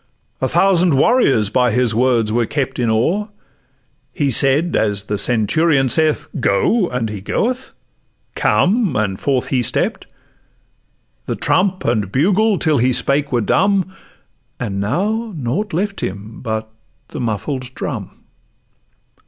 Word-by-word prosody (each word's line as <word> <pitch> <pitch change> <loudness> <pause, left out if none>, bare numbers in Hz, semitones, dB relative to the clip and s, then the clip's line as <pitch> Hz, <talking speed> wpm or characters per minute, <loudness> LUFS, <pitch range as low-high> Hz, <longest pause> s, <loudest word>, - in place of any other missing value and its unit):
A - - +1
thousand 180 -5 +3
warriors 135 - +3
by 125 0 +3
his 120 0 +2
word 115 -2 +2
were 115 0 +1
kept 135 -3 -3
In 120 -2 +1
awe: 165 - +1 0.8
he 140 -2 -1
said, 140 +7 +2
as 100 -2 0
the 105 0 -3
centurion 135 - +2
saith, 155 +2 +1
"Go," 180 - +2
and 125 -5 -2
he 105 -3 -6
goeth; 250 - -2 0.6
"come," 200 - +1
and 100 -3 -1
forth 135 -3 -1
he 130 -2 +1
stepp'd. 120 - -2 1.2
The - - -2
trump 185 +1 0
and 105 -5 0
bugle 195 - +2
till 155 -6 +2
he 125 +2 +2
spake 140 +3 +1
were 120 -2 +1
dumb— 190 - +1 0.7
And 100 -5 -3
now 205 - -2
nought 150 - -2
left 200 +4 -2
him 100 +3 -6
but 110 -2 -4 0.4
the - - -7
muffled 125 +3 -3
drum. - - -4
130 Hz, 135 wpm, -18 LUFS, 110-180 Hz, 1.2 s, thousand